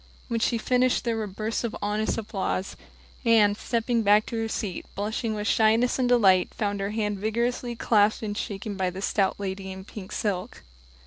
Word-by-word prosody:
When 230 -1 0
she 230 +1 +1
finished 250 +2 +2
there 235 -2 0
were 220 -1 -2
bursts 215 +5 -3
of 235 - -3
honest 210 +1 -1
applause. 200 -3 -3 0.5
Anne, 220 -4 +5
stepping 230 +2 0
back 210 0 +4
to - - -5
her 225 - -1
seat, 205 -4 -4
blushing 220 +2 -2
with 210 0 -3
shyness 225 +4 +3
and 250 -1 +2
delight, 195 -7 +4
found 205 -1 -1
her 195 0 -1
hand 210 -2 -2
vigorously 235 +3 -1
clasped 215 -1 +2
and 205 -1 -3
shaken 205 0 -4
by 190 -1 0
the 185 +2 -7
stout 195 -1 +1
lady 190 -1 -4
in 190 0 -8
pink 205 -1 -9
silk. 205 +1 -3
215 Hz, 185 wpm, -26 LUFS, 200-230 Hz, 0.5 s, Anne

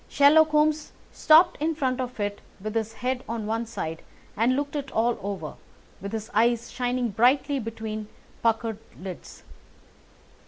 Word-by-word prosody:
Sherlock 310 +2 +6
Holmes 305 0 +1 0.2
stopped 320 +1 +5
in 320 +1 0
front 260 -4 0
of 250 -2 -6
it 205 0 -2 0.2
with 215 +2 -5
his 225 -1 -2
head 250 +2 -2
on 230 -2 -3
one 225 +2 -2
side 165 -8 -5 0.3
and 235 +4 +2
looked 285 +1 -2
it 280 -2 -3
all 235 +2 +1
over, 195 -6 -5 0.4
with 200 +1 -5
his 220 -1 -5
eyes 235 +2 +2
shining 250 -1 -1
brightly 265 +6 +3
between 220 -2 -5 0.3
puckered 225 -1 0 0.2
lids. 185 -1 -9
235 Hz, 150 wpm, -26 LUFS, 215-275 Hz, 0.4 s, Sherlock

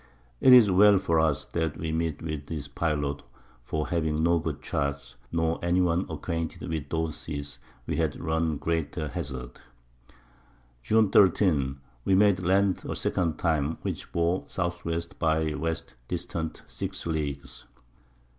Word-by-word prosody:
It 130 - +6
is 120 -6 +9
well 100 +2 +7
for 85 -4 +1
us, 80 -3 +1
that 80 -1 -2
we 80 -1 -3
met 80 -1 -2
with 75 -3 -4
this 75 -3 -5
Pilot, 70 -1 -1 0.4
for 75 +5 -3
having 80 -2 0
no 85 0 +4
good 80 -3 -3
Charts, 70 0 -3 0.2
nor 80 0 0
any 85 +1 +2
one 90 0 +2
acquainted 85 -2 -4
with 75 -3 -3
those 80 -1 -1
Seas, 70 -2 -6 0.3
we - - -2
had 80 -3 0
run 80 -1 0
greater 80 -1 -2
Hazards. 65 -7 -6 1.2
June 110 - +3
13. 75 -8 +3 0.2
We 95 - +3
made 100 -1 +5
Land 95 +2 +2
a - - -2
second 85 -4 0
time, 80 -2 0
which - - -4
bore 85 +2 0
S. - - -17
W. 85 -2 -1 0.2
by 80 -1 +1
W. 80 +2 -1 0.3
distant 80 -1 -4
6 - - -6
Leagues. 75 -4 -4
80 Hz, 145 wpm, -27 LUFS, 75-85 Hz, 1.2 s, is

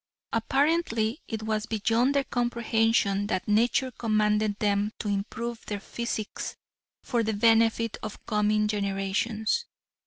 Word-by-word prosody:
Apparently 265 -1 +1
it 220 -1 -4
was 215 0 -1
beyond 230 +5 +1
their 280 - +3
comprehension 225 -5 +1
that 185 -3 -2
nature 235 +5 +2
commanded 215 -2 +1
them 205 0 +1
to 215 - -5
improve 220 +3 -3
their 205 -1 -3
physiques 220 0 -4 0.5
for 240 -3 0
the 220 -1 0
benefit 225 +1 +3
of 215 -1 -8
coming 210 0 +2
generations. 210 - -1
220 Hz, 120 wpm, -27 LUFS, 210-235 Hz, 0.5 s, their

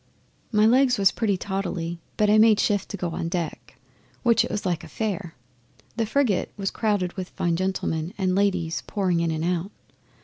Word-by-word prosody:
'My 210 -1 +4
legs 250 +2 +4
was 195 -1 +4
pretty 210 -5 0
tottly, 180 -3 -3 0.2
but 210 - +3
I 210 +1 +5
made 220 -1 +6
shift 205 -2 +1
to 200 - -5
go 175 -3 -3
on 165 - -3
deck, 170 -3 -4 0.5
which 235 -2 +4
it - - -4
was 210 - -3
like 175 -4 -1
a - - -9
fair. 200 -6 -4 0.6
The 225 -2 -1
frigate 235 -5 +1
was 195 -1 -2
crowded 205 -5 0
with 185 -2 -5
fine 170 -1 -1
gentlemen 175 -3 -2
and 185 -2 +1
ladies 185 -4 +1
pouring 185 -4 0
in 170 0 +1
and 160 0 -2
out. 180 +1 -1
190 Hz, 190 wpm, -25 LUFS, 175-210 Hz, 0.6 s, made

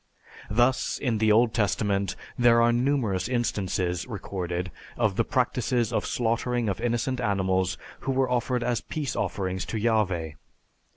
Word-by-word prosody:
Thus, 120 +4 +2
in 120 -6 -1
the 110 0 +4
Old 115 +1 +4
Testament, 100 -3 0 0.2
there 120 -1 +5
are 120 0 +5
numerous 120 -7 +1
instances 95 -7 -1
recorded 90 -5 -4 0.3
of - - +1
the - - +2
practices 120 -2 0
of - - 0
slaughtering 120 0 0
of 100 - -3
innocent 120 +2 0
animals 95 -4 +1 0.2
who 135 - -2
were 130 0 +2
offered 125 0 0
as 120 -2 0
peace 150 -4 -4
offerings 95 -2 -2
to 115 - -4
Yahveh. 95 -9 0
115 Hz, 140 wpm, -26 LUFS, 95-120 Hz, 0.3 s, there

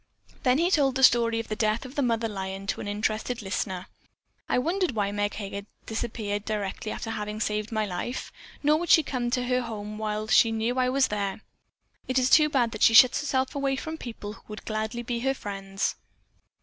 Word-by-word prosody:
Then 255 0 +3
he 345 +4 +2
told 275 -6 +3
the 265 - 0
story 230 -2 +5
of 230 - -5
the 215 - -3
death 215 +2 0
of 255 - -9
the 285 - 0
mother 230 -3 +1
lion 195 -2 -5
to - - -2
an - - -5
interested 215 +3 -2
listener. 185 -1 -3 0.6
"I - - +2
wondered 345 +4 0
why 205 -2 0
Meg 205 0 -1
Heger 200 -1 -6 0.2
disappeared 220 -2 -3
directly 215 0 -3
after 225 - -4
having 210 -1 -4
saved 210 0 -1
my 215 -1 0
life. 205 +6 -4 0.3
Nor 300 +2 +4
would 345 -1 -4
she 320 - +7
come 250 -3 -2
to 250 +1 0
her 250 0 +1
home 215 -2 -6
while 215 0 -2
she 225 +1 +5
know 225 +2 0
that 260 - -2
I 255 0 +2
was 270 +1 +2
there. 200 0 -2 0.7
It 255 - 0
is 255 0 +3
too 305 -1 +7
bad 245 -5 +2
that 215 - -7
she 225 - +6
shuts 250 +1 +8
herself 260 -2 0
away 275 -2 0
from 315 +4 -5
people 215 -4 -7
who - - -16
would 210 0 -9
gladly 220 +2 -3
be 240 0 -2
her 270 +2 0
friends." 195 -3 -3
225 Hz, 215 wpm, -27 LUFS, 210-255 Hz, 0.7 s, shuts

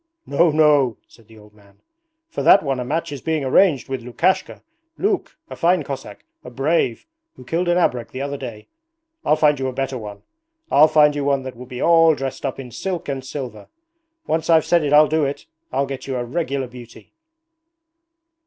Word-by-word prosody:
'No, 165 +4 +3
no,' 150 -6 +3
said 115 -3 -21
the 110 -1 -17
old 105 0 -17
man. 100 -1 -23 0.5
'For 330 - -5
that 200 - +6
one 135 -3 -1
a - - -2
match 150 +5 -3
is 140 -3 -6
being 160 -3 -1
arranged 140 +1 +3
with 130 -2 -4
Lukashka, 145 +10 -1 0.3
Luke, 400 -1 -1
a - - -8
fine 175 -1 +2
Cossack, 135 -7 -8 0.2
a - - -9
brave, 135 -1 0 0.3
who 125 - -14
killed 170 +6 -1
an 175 - +3
abrek 125 -9 0
the 130 - -8
other 140 0 -4
day. 120 -6 -8 0.6
I'll 150 - +3
find 150 -2 +3
you 130 - -1
a 130 - -4
better 135 0 -3
one. 105 -2 -9 0.5
I'll 150 +2 +7
find 150 -1 +4
you 145 - -2
one 140 -1 +1
that 130 -1 -7
will 125 +1 -11
be 125 -1 -5
all 165 -1 +5
dressed 135 0 -4
up 135 - -5
in 125 -2 -8
silk 180 - -4
and 135 -1 -3
silver. 130 -5 -7 0.6
Once 160 0 -1
I've 160 -2 +5
said 170 -2 +3
it 145 - -1
I'll 150 +1 +7
do 155 +1 +1
it. 140 +1 -3 0.3
I'll 135 +2 0
get 135 -1 -7
you 135 - -3
a 120 -1 -2
regular 140 0 -2
beauty!' 125 -1 -14
140 Hz, 200 wpm, -21 LUFS, 125-155 Hz, 0.6 s, I'll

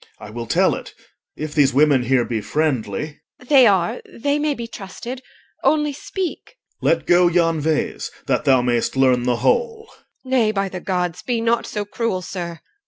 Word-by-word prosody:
OR. - - -10
I - - -10
will 115 +1 -6
tell - - +3
it, - - -8 0.4
if 155 0 -5
these 140 -3 +3
women 145 -2 +4
here 125 -1 +2
be 115 -3 -2
friendly. 145 0 -2 0.2
EL. 250 - -16
They 265 -4 +7
are. 185 -4 +1
They 285 +5 -1
may 295 -1 0
be 235 - -5
trusted. 235 +4 -8 0.4
Only 300 +1 +2
speak. 370 - -5 0.3
OR. - - +2
Let - - +1
go 175 0 +5
yon 165 -2 +2
vase, 155 +1 -1 0.2
that - - 0
thou 130 -4 +4
may'st 120 0 0
learn 130 -2 +3
the 125 -1 +2
whole. 455 -2 0
EL. - - -24 0.3
Nay, 235 -5 +3
by 195 -2 -1
the 185 - -6
Gods! 180 -3 -2
be 240 -2 -1
not 230 +1 +1
so 210 -1 -3
cruel, 205 -3 -2
sir! 175 0 -5
OR. 165 -1 -10
180 Hz, 195 wpm, -21 LUFS, -, 0.4 s, They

